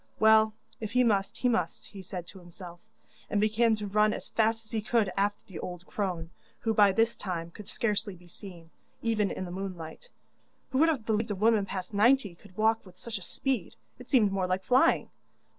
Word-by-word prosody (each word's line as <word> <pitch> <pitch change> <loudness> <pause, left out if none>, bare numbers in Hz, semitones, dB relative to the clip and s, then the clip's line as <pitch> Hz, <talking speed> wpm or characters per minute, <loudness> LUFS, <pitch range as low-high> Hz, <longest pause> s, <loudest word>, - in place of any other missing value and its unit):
Well, 220 0 +5 0.2
if 220 0 -5
he 250 0 +4
must, 200 -4 +1
he 250 - +1
must, 180 -9 -1
he 200 - -10
said 180 -2 -6
to 190 +2 -12
himself, 175 0 -11 0.5
and 205 - +1
began 220 +2 +3
to 210 -1 -5
run 210 +1 +3
as - - -6
fast 225 0 +1
as 215 - -16
he 220 - -1
could 215 -2 +1
after 205 +1 0
the 190 - -9
old 180 0 -7
crone, 175 -5 -3 0.3
who 225 -2 +1
by 205 -2 +6
this 225 +3 +2
time 170 -3 -5
could 205 +3 -11
scarcely 210 -4 -1
be 175 0 -18
seen, 175 -3 -12 0.3
even 215 -3 +1
in 185 - -4
the 175 - -7
moonlight. 185 - -7 0.6
Who 260 - +1
would 325 +2 +5
have 270 -9 -1
believed 220 0 0
a 205 - -1
woman 215 0 +3
past 185 +2 -5
ninety 220 -1 +4
could 180 +2 -19
walk 220 +1 +2
with 180 -2 -16
such 225 -5 -6
speed? 250 -3 -2 0.2
It 250 - -12
seemed 220 -7 +4
more 190 -1 0
like 185 +1 -1
flying! 255 +6 +3
205 Hz, 205 wpm, -29 LUFS, 185-225 Hz, 0.6 s, by